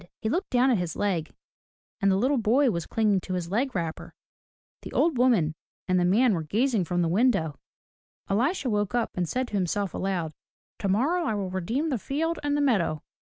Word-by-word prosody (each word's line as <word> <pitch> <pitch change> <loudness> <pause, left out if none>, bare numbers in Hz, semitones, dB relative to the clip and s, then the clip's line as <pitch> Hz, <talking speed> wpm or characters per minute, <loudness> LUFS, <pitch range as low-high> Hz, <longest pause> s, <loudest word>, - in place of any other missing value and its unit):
'* - - -69
He 220 - 0
looked 360 - -1
down 255 +1 +3
at 225 - +2
his 175 -3 -3
leg, 185 -6 -1 0.7
and 200 - +3
the 190 - +3
little 255 +7 +2
boy 245 +4 +3
was 170 -3 -3
clinging 215 -3 +2
to 185 +1 -4
his 175 -1 -4
leg 255 +5 0
wrapper. 165 -3 -4 0.7
The - - -9
old 330 -3 +2
woman 220 -12 +3 0.3
and 185 -1 +2
the 175 - +2
man 220 +6 +4
were 170 - -1
gazing 220 - 0
from 175 +1 0
the - - +1
window. 180 - +1 0.7
Elisha 260 - 0
woke 210 -1 0
up 240 -2 0
and 175 -3 -2
said 255 0 -1
to - - -17
himself 195 0 -1
aloud, 175 -5 -2 0.5
"Tomorrow 265 - +1
I 220 - 0
will 195 -3 -3
redeem 230 - -1
the 260 -6 -1
field 320 +8 -2
and 290 0 0
the - - +1
meadow. 190 - +1
205 Hz, 205 wpm, -26 LUFS, 180-255 Hz, 0.7 s, man